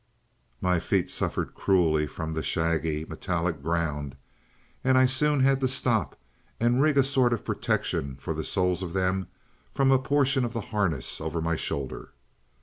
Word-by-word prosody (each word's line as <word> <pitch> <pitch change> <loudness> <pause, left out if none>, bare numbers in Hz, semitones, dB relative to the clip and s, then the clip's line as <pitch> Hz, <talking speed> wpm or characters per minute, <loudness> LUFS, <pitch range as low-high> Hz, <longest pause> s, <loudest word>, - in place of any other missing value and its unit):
"My 90 -1 +2
feet - - 0
suffered - - -2
cruelly 80 -5 +2
from 80 +3 -5
the 80 - -2
shaggy, 80 -1 0
metallic 85 -1 -2
ground, 75 -3 -2 0.7
and 130 0 +4
I 130 - +6
soon 140 +2 +2
had 135 0 +4
to 130 - +1
stop 125 -3 0 0.4
and 120 +3 +3
rig 150 -1 +3
a 135 - +6
sort 130 -3 +2
of 115 - -4
protection 70 -1 -1
for 70 +4 -4
the 80 0 -4
soles 90 -1 0
of 90 -2 -5
them 95 -1 0 0.4
from 135 -1 +2
a 135 - +5
portion 135 -1 +2
of 120 -1 -3
the 115 - -2
harness 85 - 0
over 80 +1 -3
my 85 0 0
shoulder. 70 -3 -4
90 Hz, 165 wpm, -27 LUFS, 80-130 Hz, 0.7 s, I